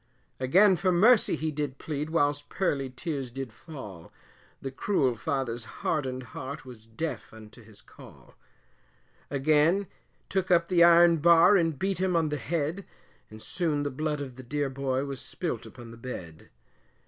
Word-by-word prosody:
Again 185 +9 +5
for 185 +2 +1
mercy 215 +5 +5
he 155 0 -2
did 145 -2 -4
plead 150 +1 -4
whilst 145 -2 0
pearly 140 -8 -1
tears 135 0 -4
did 130 -2 -7
fall, 105 - -10 0.5
The 135 - -5
cruel 135 -4 0
father's 120 -1 -3
hardened 130 +1 -3
heart, 140 +2 -7
was 115 -3 -12
deaf 115 -1 -5
unto 110 +1 -13
his 105 -1 -18
call - - -16 1.0
Again 155 +7 +2 0.4
took 190 -1 -1
up 170 -1 +3
the 175 -2 +5
iron 170 0 +7
bar, 170 +5 +6
and 165 -5 +1
beat 195 +3 -1
him 185 -1 +1
on 165 -2 +2
the 150 - -2
head, 165 +4 -2 0.5
And 110 0 -12
soon 155 -5 -1
the 145 - -2
blood 150 +2 -2
of 130 -3 -7
the 130 - -9
dear 145 +2 -2
boy, 135 0 -1
was 135 -3 -6
spilt - - -4
upon 120 -1 -12
the 115 - -12
bed. 90 -10 -8
145 Hz, 160 wpm, -28 LUFS, 130-170 Hz, 1.0 s, iron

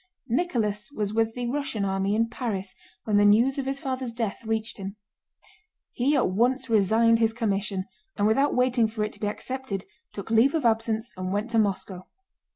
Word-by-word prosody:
Nicholas 230 - -1
was 210 -6 -3
with 225 0 +1
the 245 -1 -3
Russian 270 -5 -2
army 195 +1 0
in 230 +1 +2
Paris 215 -6 -4 0.3
when 210 -2 +1
the 205 - +5
news 235 +7 +4
of 265 - -3
his 270 0 -2
father's 260 -3 -3
death 230 -3 -3
reached 220 0 -2
him. 195 0 -6 1.0
He 275 +5 +1
at 255 -9 +2
once 250 +5 +1
resigned 225 +2 +4
his 225 -1 +2
commission, 200 -4 -1 0.3
and 205 - +2
without 275 +7 +3
waiting 250 -2 +3
for 220 -1 -3
it 210 - -3
to - - -14
be 210 - -1
accepted 220 -2 -4 0.3
took 200 +2 -7
leave 235 +7 +4
of 305 -6 0
absence 225 0 +1
and 185 0 -4
went 210 +4 -2
to 230 - +3
Moscow. 195 -3 -2
225 Hz, 185 wpm, -26 LUFS, 205-250 Hz, 1.0 s, the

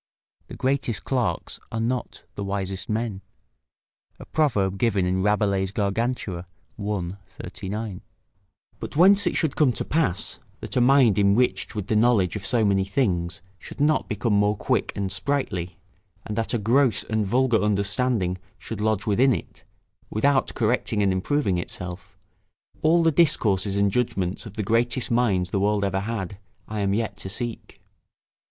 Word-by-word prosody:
["The - - -9
greatest 130 -4 -1
clerks 125 -4 -2
are 115 - -3
not 120 +1 -3
the 100 - -5
wisest 95 -1 -3
men." 110 -3 -2 1.0
A - - -9
proverb 100 -11 0
given 100 -6 +2
in 95 +1 0
Rabelais' 100 -1 +1
Gargantua, 100 -2 -2 0.3
i. 100 -4 -2 0.2
39.] 100 +1 -6 0.8
But - - -7
whence 195 +5 +6
it - - 0
should 160 -5 0
come 145 -5 +4
to - - -3
pass, 145 - 0 0.2
that - - -6
a 125 - +3
mind 125 -5 +5
enriched 100 +4 +2
with 105 -3 -3
the 110 - -1
knowledge 110 -5 +3
of 95 -2 -3
so 115 -3 +4
many 100 -1 +2
things 90 -6 -1 0.2
should - - -11
not 150 +2 +2
become 110 0 0
more 105 +1 +2
quick - - 0
and 100 -1 -2
sprightly, 95 - -2 0.5
and 105 - -4
that 115 +2 0
a - - +2
gross 115 +1 +3
and 110 -1 -1
vulgar 120 +2 +2
understanding 100 -1 +1 0.2
should 110 -2 -6
lodge 110 -1 0
within 120 +4 +3
it, - - -9 0.5
without 135 +5 +1
correcting 110 -2 +1
and 100 - +3
improving 95 -1 0
itself, 90 +1 -7 0.6
all 165 +2 +4
the 165 - +4
discourses 105 - +2
and 100 0 +2
judgments 95 -5 -1
of 105 - -12
the 110 - -2
greatest 115 +4 +1
minds 100 -7 +1
the 100 - 0
world 100 0 +1
ever 95 -1 0
had, 100 -2 -4 0.3
I 105 0 -4
am 100 -1 +1
yet 110 0 -2
to 95 - -4
seek. 115 +3 -4
105 Hz, 160 wpm, -24 LUFS, 95-120 Hz, 1.0 s, whence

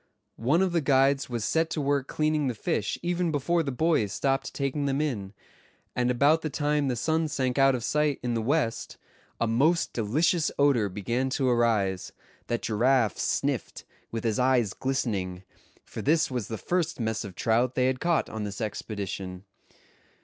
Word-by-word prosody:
One 150 +10 +3
of 190 - 0
the 170 -1 +1
guides 135 -1 +3
was 120 -3 -2
set 160 +6 +1
to 160 - -3
work 140 -1 0
cleaning 155 -2 0
the 125 - -2
fish 105 -1 -1
even 175 -1 0
before 155 +4 +1
the 145 -4 -2
boys 140 -7 +1
stopped 135 -2 -1
taking 140 +1 -2
them 140 0 0
in; 115 -11 -2 0.6
and 125 0 +1
about 145 +6 +3
the 155 - -2
time 145 0 0
the 125 - 0
sun 160 +6 0
sank 130 -2 -1
out 135 -1 +5
of 120 - -4
sight 150 +1 +1
in 120 -1 -1
the 115 - 0
west, 130 -1 -1 0.4
a - - +2
most 140 +10 +2
delicious 155 - +1
odor 135 -8 +3
began 115 +7 -2
to 135 0 0
arise, 110 -6 +1 0.3
that 120 -3 -2
Giraffe 115 - +2
sniffed, - - -2 0.2
with 115 -1 -4
his 115 -1 0
eyes 125 -5 +2
glistening; 100 -9 -2 0.4
for - - -7
this 160 +1 +2
was 125 -5 -3
the 110 - -4
first 175 - -1
mess 110 -1 -1
of 100 -4 -9
trout 120 +3 +1
they 125 - +2
had 130 0 0
caught 170 -1 +1
on 110 -1 -5
this 100 -1 -5
expedition. 100 -4 -5
130 Hz, 180 wpm, -27 LUFS, 115-150 Hz, 0.6 s, out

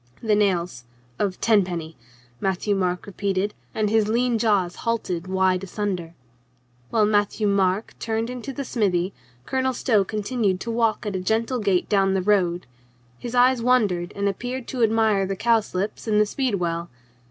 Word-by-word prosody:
"The 220 -2 +2
nails 180 - 0 0.2
— 120 0 -34
of 195 -3 -1
tenpenny," 180 -7 +1 0.4
Matthieu 195 +2 0
Marc 180 -2 -1
repeat 200 -1 -3
ed, 205 +2 0 0.2
and 215 -1 +1
his 215 0 +2
lean 235 +1 +1
jaws 200 -6 +1
halted 185 -7 -2
wide 190 0 +1
asunder. 185 -4 -4 0.7
While 220 -2 +3
Matthieu 210 0 +1
Marc 200 0 +1
turned 225 0 -1
into 250 +2 -6
the 275 +1 -5
smithy 190 -6 0 0.3
Colonel 260 0 0
Stow 225 -5 +2
continued 210 -1 -1
to 230 - -3
walk 230 -1 +1
at 205 -2 -3
a - - -1
gentle 225 +6 0
gait 195 -4 +1
down 195 -1 +2
the 190 - 0
road. 180 -4 +2 0.5
His 240 0 -5
eyes 250 0 +4
wandered 210 -8 +2
and 200 0 0
appeared 245 +6 -4
to 255 - -3
admire 220 -3 +3
the 195 - -2
cowslips 215 -2 0
and 210 -1 +3
the 210 - +5
speedwell. 180 -9 -2
205 Hz, 165 wpm, -24 LUFS, 185-225 Hz, 0.7 s, the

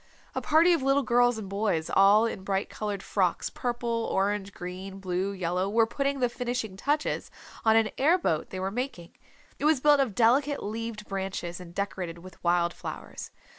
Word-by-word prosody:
A - - -2
party 320 +3 +5
of 330 - +1
little 275 +1 +3
girls 245 -1 +3
and 215 -3 -6
boys 200 -5 -1
all 200 +3 +5
in 205 -4 -4
bright 195 0 -1
colored 205 -2 -4
frocks, 185 -4 0
purple, 235 -2 -2
orange, 200 0 0
green, 185 +2 -7
blue, 185 +1 -1
yellow, 185 0 -1
were 225 +2 +4
putting 275 +4 -1
the 245 - +4
finishing 240 -4 -3
touches 295 +9 -1 0.3
on 220 0 +5
an 225 -1 +3
air 315 +7 +5
boat 160 - -1
they 185 - -5
were 190 +1 -2
making. 235 -7 -4 0.5
It 285 - -2
was 305 -3 +4
built 290 +1 +5
of 250 -8 0
delicate 270 +6 +3
leaved 220 0 -5
branches 190 -3 -4
and 175 -1 -11
decorated 185 -4 -3
with 185 +2 -14
wild 175 0 +2
flowers. - - -7
210 Hz, 180 wpm, -28 LUFS, 190-245 Hz, 0.5 s, party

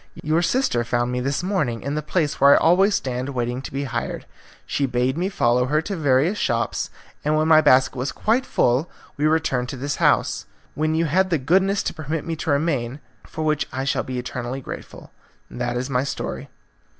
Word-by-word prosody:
Your 155 +3 +2
sister 175 - +1
found 120 +1 0
me 125 - -1
this 135 +5 -1
morning 150 - -1
in 140 +2 -2
the 150 - -1
place 150 0 -1
where 140 +1 +8
I - - +5
always 190 +5 +4
stand 130 -4 -2
waiting 125 -1 -2
to - - -8
be 140 +1 -3
hired. 120 -3 -4 0.4
She 140 - -1
bade 125 +1 0
me 180 +4 -1
follow 125 -8 +2
her 150 +3 +2
to 200 +3 -4
various 155 +5 +2
shops, 120 -6 -1 0.3
and 150 +1 +1
when 155 +1 +2
my 155 -1 +7
basket 130 -3 +4
was 130 +2 -2
quite 235 +4 +1
full 130 - +1 0.3
we 150 +2 +1
returned 135 -6 +1
to 135 - -5
this 140 +3 -3
house, - - +2 0.3
when 155 +1 0
you 165 +1 +2
had 185 +5 +2
the 165 - +2
goodness 190 +8 +2
to - - -2
permit 155 0 -4
me 165 - -2
to 160 - -4
remain, 140 -3 0 0.3
for 155 - -5
which 155 -1 0
I 130 +1 -3
shall 135 -1 0
be 130 -1 -5
eternally 125 +1 -4
grateful. 135 - -9 0.4
That 120 0 -2
is 125 +1 -2
my 130 -2 0
story." 140 - -5
140 Hz, 205 wpm, -22 LUFS, 125-160 Hz, 0.4 s, where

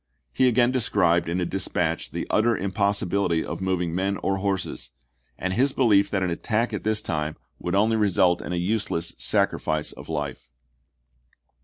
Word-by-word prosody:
He 130 - +3
again 120 0 +3
described 90 -9 +2
in 85 +2 -1
a 90 - 0
dispatch 85 -3 -2
the - - -4
utter 115 0 +3
impossibility 100 -3 0
of - - -5
moving 90 -3 -1
men 95 +2 0
or 95 0 +1
horses, 95 -1 -3 0.5
and 95 +1 -2
his 135 +6 +2
belief 105 -6 +4
that 95 -2 0
an 90 - 0
attack 110 +6 -1
at 105 - -3
this 110 0 0
time 75 -1 -2 0.2
would 90 +1 -2
only 110 +3 +3
ibid. - - 0
result 90 -3 +3
in - - -6
a - - -1
useless 90 -2 0
sacrifice 75 -1 0
of - - -12
life. 75 -6 -4
95 Hz, 170 wpm, -25 LUFS, 85-105 Hz, 0.5 s, belief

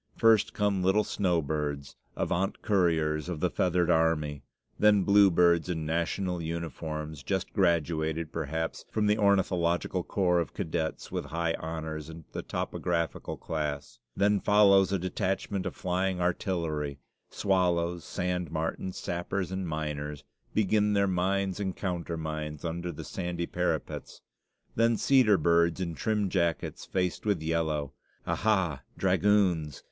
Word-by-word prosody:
First 115 -2 +4
come 100 -2 +1
little 95 +3 +3
snowbirds, 75 -7 -1 0.2
avant 95 +3 -1
couriers 80 -6 +1
of 85 -4 -3
the - - 0
feathered 90 -2 +2
army; 75 -3 +1 0.4
then 105 -2 +5
bluebirds 90 -4 +5
in 80 -3 -2
national 85 +3 -1
uniforms, 80 -2 -5
just 65 - -2
graduated, 80 -1 +1
perhaps, 80 0 -3
from 110 - 0
the 105 +1 +2
ornithological 90 -3 +2
corps 90 -2 +1
of 85 -5 -3
cadets 80 0 -3
with - - -3
high 85 0 -1
honors 80 -1 -5
in 80 -1 -10
the - - -4
topographical 85 -5 -2
class; 75 -3 -4 0.2
then 100 +1 +3
follows 100 -2 +5
a 100 - +2
detachment 95 +1 -2
of - - -5
flying 95 0 -1
artillery 85 -5 -1 0.3
swallows; 90 -3 +1
sand 90 0 -2
martens, 80 +3 -3
sappers 90 +1 -3
and 95 -1 -3
miners, 75 -2 -4 0.3
begin 105 0 +3
their 100 -1 +3
mines 95 +1 0
and 95 -2 -2
countermines 80 -4 -4
under 85 +1 -3
the 75 - -8
sandy 85 -2 -3
parapets; 90 +1 -3 0.5
then 115 0 +3
cedar 125 -7 +5
birds, 85 +1 +3
in 85 -3 -2
trim 105 +4 0
jackets 85 -3 -1
faced 90 -2 -1
with 100 -7 0
yellow 80 -3 -1 0.3
aha, 95 -10 +1 0.2
dragoons! 90 -8 +2
85 Hz, 130 wpm, -29 LUFS, 80-95 Hz, 0.5 s, then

